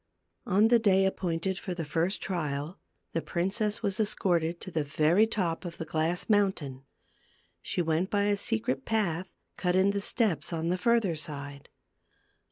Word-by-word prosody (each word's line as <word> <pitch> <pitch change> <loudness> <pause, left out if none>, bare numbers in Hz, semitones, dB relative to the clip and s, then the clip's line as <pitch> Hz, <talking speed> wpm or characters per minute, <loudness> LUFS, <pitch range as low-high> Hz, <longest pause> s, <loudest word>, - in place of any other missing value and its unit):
On 210 +4 +4
the 240 -1 +6
day 195 -3 +4
appointed 185 0 -1
for 185 -3 -5
the 165 -2 -4
first 165 +6 -1
trial, 155 -2 -3 0.3
the 165 - 0
princess 205 +7 -1
was 200 -1 0
escorted 175 -5 +1
to 185 - -7
the 160 -2 0
very 155 +8 +3
top 180 -7 -1
of 175 -2 -7
the 165 - -5
glass 160 +3 -1
mountain; 180 - +1 0.8
she 175 - -1
went 165 +3 0
by 205 -1 +1
a 205 0 +2
secret 130 - -1
path 185 -4 -1 0.3
cut 180 -1 0
in 190 +1 +4
the 200 0 -2
steps, 190 - +1
on 165 0 -1
the 180 - +1
further 225 -5 +2
side. 145 -2 -7
180 Hz, 165 wpm, -29 LUFS, 160-200 Hz, 0.8 s, the